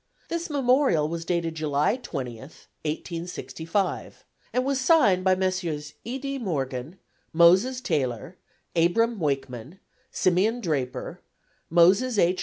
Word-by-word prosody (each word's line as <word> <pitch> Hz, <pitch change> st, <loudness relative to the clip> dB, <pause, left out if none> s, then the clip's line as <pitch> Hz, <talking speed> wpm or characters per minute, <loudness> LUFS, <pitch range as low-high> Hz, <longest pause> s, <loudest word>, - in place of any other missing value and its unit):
This 335 Hz, 0 st, -3 dB
memorial 260 Hz, -, +2 dB
was 165 Hz, +1 st, -5 dB
dated 170 Hz, -1 st, -1 dB
July 150 Hz, +3 st, +1 dB
20, 135 Hz, -, -6 dB
1865, 165 Hz, -, -5 dB, 0.3 s
and 255 Hz, +1 st, 0 dB
was 275 Hz, -1 st, 0 dB
signed 255 Hz, -, +4 dB
by 185 Hz, 0 st, +4 dB
Messrs. 180 Hz, -6 st, -2 dB
E. 245 Hz, +3 st, -4 dB
D. 275 Hz, 0 st, -4 dB
Morgan, 140 Hz, -, -3 dB, 0.4 s
Moses 185 Hz, +10 st, +5 dB
Taylor, 145 Hz, -, -2 dB, 0.4 s
Abram 210 Hz, +7 st, +2 dB
Wakeman, 135 Hz, +1 st, -3 dB, 0.3 s
Simeon 195 Hz, +6 st, +1 dB
Draper, 145 Hz, -, -3 dB, 0.5 s
Moses 195 Hz, +9 st, +4 dB
H. 180 Hz, 0 st, +3 dB
175 Hz, 110 wpm, -25 LUFS, 155-230 Hz, 0.5 s, Moses